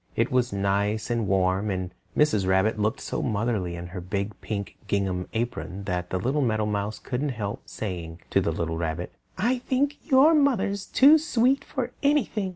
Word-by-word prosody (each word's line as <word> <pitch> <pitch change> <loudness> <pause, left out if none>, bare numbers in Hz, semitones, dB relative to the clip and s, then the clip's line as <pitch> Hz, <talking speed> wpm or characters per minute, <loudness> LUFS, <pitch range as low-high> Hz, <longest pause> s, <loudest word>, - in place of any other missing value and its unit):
It 115 - +1
was 125 -1 +2
nice 100 +3 0
and 115 -3 0
warm, 95 +2 +1
and 95 -2 -2 0.3
Mrs. 110 -11 +3
Rabbit 95 +4 +2
looked 110 +4 0
so - - -3
motherly 105 -6 -1
in 85 0 -6
her 90 +1 -7
big 100 +3 -3
pink 100 -2 -4
gingham 95 -2 -1
apron 110 -4 -3
that 90 -2 -3
the 95 - -1
little 130 +10 0
meadowmouse 105 -3 0
couldn't 135 +3 -3
help 100 -2 -3
saying 85 -5 -5
to - - +4
the - - 0
little 80 -1 -2
rabbit, 85 +1 -3 0.2
"I 240 +6 +1
think 275 +3 0
your 280 +4 +6
mother's 255 -9 +2
too 295 +4 +7
sweet 270 -4 +2
for - - -3
anything." 270 -9 +1
105 Hz, 170 wpm, -26 LUFS, 95-150 Hz, 0.3 s, too